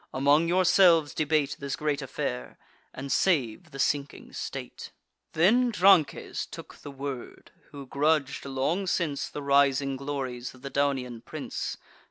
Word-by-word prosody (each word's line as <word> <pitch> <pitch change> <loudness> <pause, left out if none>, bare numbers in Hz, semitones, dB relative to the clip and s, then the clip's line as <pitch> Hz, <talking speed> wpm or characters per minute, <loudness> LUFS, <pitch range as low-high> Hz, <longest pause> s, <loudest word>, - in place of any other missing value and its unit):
Among 145 +5 +4
yourselves 180 -3 +4
debate 150 -2 0
This 140 -1 -3
great 150 -2 -1
affair, 60 0 -4 0.3
and 135 +1 -7
save 135 - +1
the 135 - -10
sinking 140 0 -2
state." - - -6 0.4
Then 235 +10 +4
Drances 195 -6 +3
took - - -11
the - - -10
word, 135 -2 -7 0.2
who 140 -1 -9
grudg'd, 140 +1 0
long 140 +8 -1
since, 155 -5 -1
The 145 - -6
rising 140 -1 +3
glories 130 -3 -5
of 130 - -19
the 140 - -6
Daunian 130 -4 -1
prince. - - -5
140 Hz, 135 wpm, -27 LUFS, 135-160 Hz, 0.4 s, Among